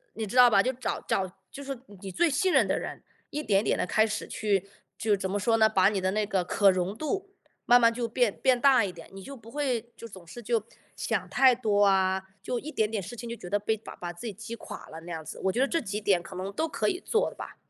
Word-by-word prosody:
你 220 -1 -3
知 220 - -7
道 250 -1 +8
吧？ 195 -3 +5
就 255 +4 0
找 255 - -3
找 190 - +1 0.2
就 280 - -9
是 275 0 -4
说 245 - -13 0.2
你 195 -1 -6
最 335 - +2
信 365 +6 +1
任 - - +4
的 - - +1
人， - - -6 0.3
一 300 - -3
点 200 -8 +2
一 - - -6
点 - - +1
地 - - 0
开 220 - +3
始 215 0 -3
去 200 -3 -1 0.3
就 215 -2 +2
怎 190 -1 -3
么 205 - 0
说 225 +3 +2
呢？ 220 -1 +5
把 190 -3 +4
你 200 -2 0
的 185 0 +1
那 215 +1 0
个 195 -3 0
可 195 +2 +4
容 185 +1 0
度 390 +5 -3 0.3
慢 245 0 +7
慢 230 -1 +4
就 235 -1 -3
变 240 -3 +1
变 255 -2 +4
大 270 -4 +5
一 195 - -2
点， 170 -2 -13
你 195 -1 -9
就 275 -1 -9
不 225 0 -14
会， 250 -5 -2
就 - - -10
总 190 -6 -12
是 240 +8 -10
就 225 -1 0 0.3
想 - - -2
太 260 -2 +5
多 210 -4 +2
啊， 190 -1 +2 0.2
就 245 +3 -2
一 310 +2 -8
点 215 -1 +1
点 215 -3 -1
事 215 +6 -8
情 235 0 -7
就 235 - -5
觉 180 - -9
得 205 - +2
被 220 +2 -1
把 215 - -11
把 175 -1 -6
自 175 +7 -8
己 215 - -4
击 220 +3 -8
垮 - - -9
了 160 - -8
那 175 - -7
样 160 -1 -5
子， - - -9
我 - - +4
觉 240 +7 0
得 275 - +3
这 330 - 0
几 210 -5 -4
点 195 -4 +2
可 185 +2 -11
能 190 +2 -4
都 320 +11 -1
可 - - 0
以 365 -2 -2
做 445 +2 0
的 - - -15
吧。 - - -8
220 Hz, 310 characters per minute, -28 LUFS, 195-245 Hz, 0.3 s, 道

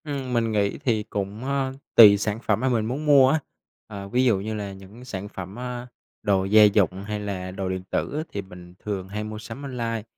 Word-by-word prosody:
Ừm, 140 -4 -4
mình 115 -2 +1
nghĩ 100 -2 0
thì 115 -7 0
cũng, 105 +2 -5
ờ, 135 -1 -1 0.2
tùy 105 -3 +10
sản 105 +1 -2
phẩm 110 -3 +1
mà 130 +2 +1
mình 115 -4 +1
muốn 135 +7 -3
mua 140 -3 +7
á. 155 - +2 0.5
Ờ, 100 -2 -7
ví 125 +6 +1
dụ 110 -6 +3
như 110 +3 -4
là 100 -2 -4
những 95 +6 -13
sản 100 -5 -5
phẩm, 95 +4 -8
à, 125 0 -5 0.3
đồ 95 -2 +1
gia 105 +2 +6
dụng 100 -2 +3
hay 105 +1 -4
là 95 -3 -4
đồ 95 0 -4
điện 95 0 -3
tử - - -1
á 155 - -1
thì 100 - -4
mình 90 -2 -13
thường 100 -3 -4
hay 105 +1 -4
mua 110 0 -6
sắm 115 +4 -8
online, 115 -5 -3
105 Hz, 230 wpm, -24 LUFS, 100-125 Hz, 0.5 s, tùy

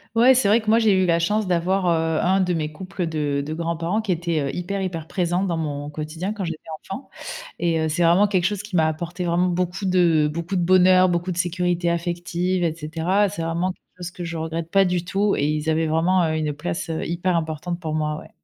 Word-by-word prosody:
Ouais, 250 +3 +7
c'est 250 -5 +2
vrai 220 +3 +4
que 215 - -4
moi 225 +1 +5
j'ai 215 -3 +4
eu 185 -1 +3
la 170 -1 +2
chance 210 +4 0
d'avoir, 180 +2 +1
heu, 160 -1 +1
un 190 +2 +3
de 180 -1 +1
mes 155 -2 -2
couples 185 +2 -5
de 145 -3 -1
de 155 - -4
grands-parents 170 +5 -1
qui 210 - -2
était, 170 -2 0
heu, 140 -1 -3
hyper, 195 +3 -3
hyper 165 -4 -4
présent 180 +1 0
dans 170 -4 -1
mon 145 -2 -3
quotidien 160 +6 -4
quand 205 -3 -5
j'étais 165 -2 -4 0.3
enfant, 255 +8 -6 0.5
et 165 -2 +1
heu, 160 - 0
c'est 165 +3 0
vraiment 175 +5 +5
quelque 185 -4 0
chose 205 +1 0
qui 210 -3 -10
m'a 160 - +4
apporté 170 +3 -4
vraiment 175 +1 +2
beaucoup 180 +2 -2
de 170 -5 +3
beaucoup 170 +4 -3
de 180 - +1
bonheur, 185 +1 +5
beaucoup 175 +1 -1
de 170 - -6
sécurité 175 -1 0
affective 175 +1 -1
et 160 -2 0
cetera. 165 +6 0
C'est 185 -4 -5
vraiment 170 +3 -1
quelque - - -31
chose 180 -1 -6
que 175 -1 -7
je 165 0 -5
regrette 160 +1 -4
pas 195 0 +5
du 180 -1 0
tout 200 +2 +1
et 145 - +1
ils 155 +1 0
avaient 160 +1 +1
vraiment, 170 +4 +2
heu, 160 -1 0
une 155 -1 -1
place, 165 +4 -4
heu, 160 - -2
hyper 175 +1 0
importante 160 +2 -3
pour 155 -3 -3
moi, 150 0 -1
ouais. - - -11
175 Hz, 240 wpm, -23 LUFS, 160-185 Hz, 0.5 s, Ouais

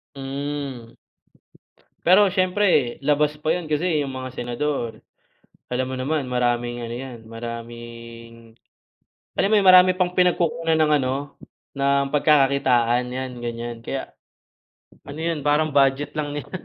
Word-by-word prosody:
Hmm. 135 -3 -5 1.1
Pero 190 +4 +6
syempre 185 -9 +2
labas 150 0 +2
pa 155 +1 0
yun 170 -2 -4
kasi 155 +1 0
yung 135 -2 -4
mga 130 -1 -6
senador, 120 -2 -3 0.7
alam 130 +1 0
mo 130 - -4
naman 135 +1 -2
maraming 120 -1 0
ano 115 - -6
yan 125 -1 -7
maraming 115 0 -9 0.9
alam 195 - +3
mo - - +4
yun 195 - +1
marami 185 0 +8
pang 180 -1 0
pinagkukunan 170 -2 +2
ng 155 -1 +3
ano 135 +2 -3 0.4
ng 140 0 +1
pagkakakitaan 135 -5 +3
yan 130 0 -4
ganyan 120 0 -5
kaya, 135 +2 -5 1.0
ano 145 - -8
yun 160 -2 -2
parang 150 +1 +2
budget 135 0 +3
lang 145 -1 -3
nila, 145 -1 -6
140 Hz, 130 wpm, -23 LUFS, 120-155 Hz, 1.1 s, marami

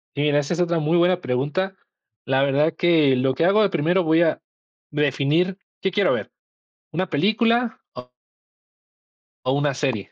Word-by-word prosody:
Mira, 145 0 +1
esa 145 +4 -2
es 175 - -4
otra 170 -1 0
muy 155 +3 0
buena 180 +1 +2
pregunta, 145 +10 -2 0.5
la 135 +1 +1
verdad 145 +3 +1
que 155 -6 +3
lo 130 +1 +1
que 165 +5 0
hago 210 +3 +4
de 200 - +2
primero, 175 +2 +1
voy 160 +1 +3
a 160 -2 +1 0.5
de 150 0 -2
definir, 155 +7 0 0.2
¿qué 190 - 0
quiero 200 +1 +2
ver?, - - -4 0.6
una 185 +4 -2
película 225 +8 +1
o? 125 0 -10 1.4
¿o 130 - 0
una 145 0 0
serie?, 130 -7 -3
160 Hz, 165 wpm, -22 LUFS, 140-185 Hz, 1.4 s, hago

